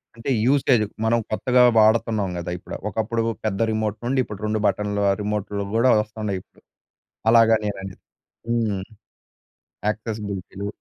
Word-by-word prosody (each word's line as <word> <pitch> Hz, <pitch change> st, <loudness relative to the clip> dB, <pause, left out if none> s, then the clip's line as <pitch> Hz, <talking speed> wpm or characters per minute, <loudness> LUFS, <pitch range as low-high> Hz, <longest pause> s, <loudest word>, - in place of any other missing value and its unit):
అంటే 115 Hz, +3 st, -6 dB, 0.2 s
యూసేజ్ 130 Hz, -4 st, +3 dB, 0.2 s
మనం 115 Hz, +1 st, +3 dB
కొత్తగా 125 Hz, +3 st, +3 dB, 0.2 s
వాడుతున్నాం 110 Hz, -3 st, +3 dB
కదా 85 Hz, 0 st, -4 dB
ఇప్పుడు. -, -, -8 dB
ఒకప్పుడు 110 Hz, +3 st, -1 dB, 0.2 s
పెద్ద 100 Hz, -2 st, -1 dB
రిమోట్ 110 Hz, -1 st, -1 dB
నుండి 130 Hz, +2 st, +1 dB
ఇప్పుడు 105 Hz, -2 st, -9 dB
2 110 Hz, 0 st, 0 dB
బటన్‌ల 100 Hz, +1 st, -1 dB, 0.2 s
రిమోట్‌లు 105 Hz, -1 st, -2 dB
కూడా 120 Hz, +3 st, +4 dB
వస్తున్నాయిప్పుడు 105 Hz, -3 st, -6 dB, 0.7 s
అలాగా 115 Hz, -1 st, +6 dB
నేననేది. 95 Hz, -2 st, -5 dB, 0.5 s
హ్మ్. 110 Hz, -5 st, 0 dB, 1.1 s
యాక్సెసిబిలిటీలు. 105 Hz, -3 st, -5 dB
105 Hz, 115 wpm, -23 LUFS, 100-115 Hz, 1.1 s, అలాగా